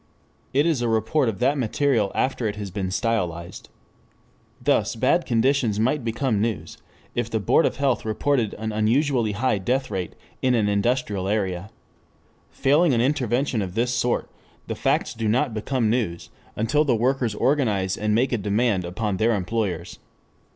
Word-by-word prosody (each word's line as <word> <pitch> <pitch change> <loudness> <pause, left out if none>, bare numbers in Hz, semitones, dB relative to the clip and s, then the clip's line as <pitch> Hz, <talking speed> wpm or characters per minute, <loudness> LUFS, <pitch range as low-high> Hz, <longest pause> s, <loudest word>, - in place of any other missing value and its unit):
It 140 +3 +2
is 160 -7 +1
a 120 - 0
report 115 +5 +1
of 105 - -4
that 140 +4 +1
material 120 -3 +1
after 130 -3 0
it 105 - -3
has 100 -2 -6
been 95 -1 -3
stylized. 90 -5 -2 0.9
Thus - - +1
bad - - +2
conditions 120 -2 +2
might 130 +5 +1
become 115 -1 0
news 95 -8 -3 0.3
if 120 -1 -2
the 110 - -1
Board 105 - +3
of - - -3
Health 135 -4 0
reported 115 +1 0
an 110 +1 -4
unusually 115 +1 +1
high 115 -1 0
death 130 +7 -1
rate 90 -2 -3 0.3
in 130 -1 +3
an 110 -3 +2
industrial 105 -2 0
area. 95 -2 -1 0.8
Failing 145 +1 +3
an - - +1
intervention 130 -2 0
of 90 -2 -5
this 120 +2 +1
sort, 120 0 0 0.4
the - - -3
facts - - 0
do 115 -1 -3
not 125 +3 +1
become 110 +1 0
news, 110 -9 -2 0.2
until 140 +8 +2
the 135 -6 +2
workers 120 -1 0
organize 105 -9 +1
and 105 0 0
make 125 +3 +2
a 120 - 0
demand 105 -1 +1
upon 95 +3 -2
their 115 +3 +2
employers. 95 -3 -3
115 Hz, 165 wpm, -24 LUFS, 105-130 Hz, 0.9 s, Board